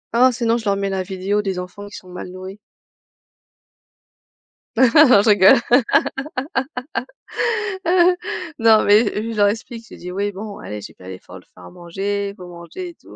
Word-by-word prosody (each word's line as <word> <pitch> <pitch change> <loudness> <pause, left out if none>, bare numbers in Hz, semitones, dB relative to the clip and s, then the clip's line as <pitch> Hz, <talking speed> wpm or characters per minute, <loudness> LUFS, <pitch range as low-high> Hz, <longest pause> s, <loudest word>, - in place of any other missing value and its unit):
Oh, 250 +2 +6
sinon 235 -1 0
je 230 - -8
leur 200 -1 +1
mets 200 0 -2
la 190 -1 -1
vidéo 190 +2 -2
des 195 -3 -3
enfants 180 +3 -8
qui 205 - -12
sont 185 - -14
mal 180 0 -8
nourris. 185 +2 -9 2.2
Non, 255 -1 +6
je 220 - +1
rigole. 200 0 +6 3.0
Non, 225 -1 +5
mais 210 +3 +5 0.3
je - - -6
leur 205 -1 +4
explique, 225 +2 -5
je - - -11
dis: 180 - -8
«Oui, 200 +2 -2
bon, 205 +1 -8
allez 105 0 -7
j'ai - - -11
fait 90 - -15
l'effort 95 0 -10
de - - -22
faire 90 - -16
à 90 - -11
manger, 200 - -4
il 200 - -10
faut 180 -2 -11
manger 175 - -9
et - - -12
tout - - -17
200 Hz, 175 wpm, -20 LUFS, 180-220 Hz, 3.0 s, Oh